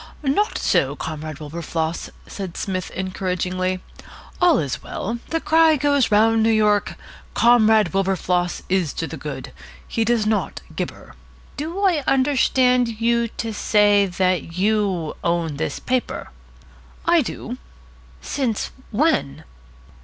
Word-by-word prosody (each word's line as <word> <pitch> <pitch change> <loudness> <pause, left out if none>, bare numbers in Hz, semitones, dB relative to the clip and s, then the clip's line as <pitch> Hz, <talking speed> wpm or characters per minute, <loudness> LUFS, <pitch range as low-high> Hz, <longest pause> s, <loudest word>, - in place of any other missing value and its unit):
"Not 300 +10 +1
so, - - +1
Comrade 155 -1 -6
Wilberfloss," 160 +1 -3 0.2
said 190 -4 -7
Psmith 185 -2 -3
encouragingly. 185 0 -2 0.6
"All 350 -5 +5
is 140 - -2
well. 230 +4 -4
The 325 - 0
cry 320 0 +4
goes 285 -4 +2
round 225 +2 +4
New 225 - +3
York, 210 -2 +2 0.4
'Comrade 220 -5 +4
Wilberfloss 185 -2 0
is 185 -5 0
to 165 - -3
the 160 - -7
good. 140 -2 -7 0.4
He 225 - 0
does 230 -1 +1
not 215 -1 -1
gibber.'" - - -6 0.4
"Do 325 +7 -4
I 355 -7 +2
understand 255 -3 +2
you 235 0 +2
to 225 0 -5
say 205 -1 +3
that 180 -2 -1
you 195 -5 0
own 170 -3 0
this - - -2
paper?" 255 -1 -2 0.7
"I 340 -1 +5
do." 245 -1 -6 0.6
"Since 250 -7 -2 0.2
when?" 210 - 0
210 Hz, 125 wpm, -22 LUFS, 180-250 Hz, 0.7 s, All